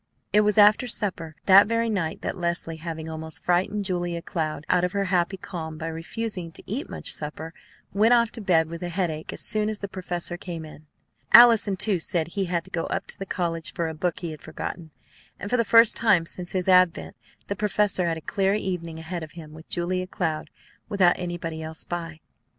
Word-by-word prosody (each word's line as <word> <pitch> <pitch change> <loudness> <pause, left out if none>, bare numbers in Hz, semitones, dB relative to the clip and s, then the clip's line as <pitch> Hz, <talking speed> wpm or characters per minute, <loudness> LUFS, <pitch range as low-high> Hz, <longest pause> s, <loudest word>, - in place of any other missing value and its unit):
It 210 - +6
was 210 +1 +1
after 210 +4 +6
supper 175 -8 -3
that 195 +1 +8
very 230 +1 +1
night 185 -8 -2
that - - -2
Leslie, 170 -2 -2
having 160 -1 -6
almost 160 0 -6
frightened 190 +3 +1
Julia 175 -2 -2
Cloud 155 -4 -3
out 180 -1 +3
of 180 +1 0
her 200 -1 +1
happy 180 +2 +1
calm 160 -4 -6
by 160 - -5
refusing 175 +2 -5
to - - -10
eat 250 +9 -4
much - - -3
supper, 155 +2 -6 0.4
went 215 +4 +4
off 235 -1 +2
to 230 - -8
bed 170 -5 +3
with 165 +1 -7
a 175 - -3
headache 170 -3 -2
as - - -6
soon 215 0 +2
as 215 - -3
the 200 - -5
professor 180 -2 -4
came 170 -3 -6
in. 155 0 -13 0.5
Allison, 225 -4 +8
too, 205 -2 +1
said 165 0 -1
he 195 +2 -2
had 170 -1 -1
to - - -16
go 165 - -2
up - - -2
to - - -7
the 195 - -5
college 165 -3 -2
for 170 -4 -1
a 160 - -4
book 170 +2 -2
he 170 -2 -4
had 155 - -10
forgotten; 160 +1 -6 0.5
and 205 - -6
for 250 - +3
the 230 - +3
first 230 +1 +6
time 200 -7 +3
since 175 +1 -6
his 185 -1 -1
advent 185 -2 +3 0.3
the 200 - -3
professor 205 -3 +1
had 165 -1 -1
a - - -8
clear 195 +3 +1
evening 180 -5 -3
ahead 165 +2 -5
of 155 -2 -9
him 155 -3 -10
with 160 +1 -13
Julia 185 +1 -1
Cloud, 155 -3 -2 0.4
without 190 -4 +4
anybody 170 -2 -4
else 160 0 -5
by. 165 -2 -6
175 Hz, 215 wpm, -25 LUFS, 165-200 Hz, 0.5 s, that